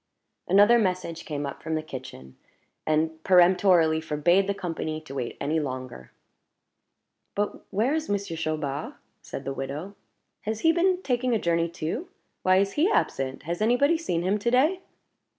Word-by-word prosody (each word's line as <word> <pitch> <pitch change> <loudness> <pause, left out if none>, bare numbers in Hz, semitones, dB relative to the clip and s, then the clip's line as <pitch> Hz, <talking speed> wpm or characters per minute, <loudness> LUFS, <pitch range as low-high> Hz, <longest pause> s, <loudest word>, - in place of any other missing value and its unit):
Another 205 +5 +6
message 180 -5 -2
came 145 -2 -3
up 140 - -6
from 160 - -2
the 155 - -2
kitchen, 125 - -9 0.5
and 160 +1 0
peremptorily 180 -3 +5
forbade 165 +5 +2
the 200 - -1
company 165 -4 -4
to 155 -3 -11
wait 125 -3 -4
any 155 +3 0
longer. 130 - -6 1.2
"But 205 +1 -3
where 225 +8 +1
is 315 0 -2
Monsieur 200 -4 -2
Chaubard?" 155 -3 -3 0.3
said - - -8
the 135 - -2
widow. 140 +9 -5 0.5
"Has 220 +1 -3
he 325 - +5
been 360 +2 +1
taking 250 -1 +1
a - - +1
journey 170 -1 +1
too? 175 - -4 0.3
Why 185 0 +4
is 195 +1 +2
he 315 - +2
absent? 135 - -1
Has 170 +5 -4
any 230 +3 +4
body 285 +6 +3
seen 175 - -2
him 195 +3 +1
to 235 - 0
day?" 295 +10 +3
175 Hz, 165 wpm, -26 LUFS, 155-215 Hz, 1.2 s, Another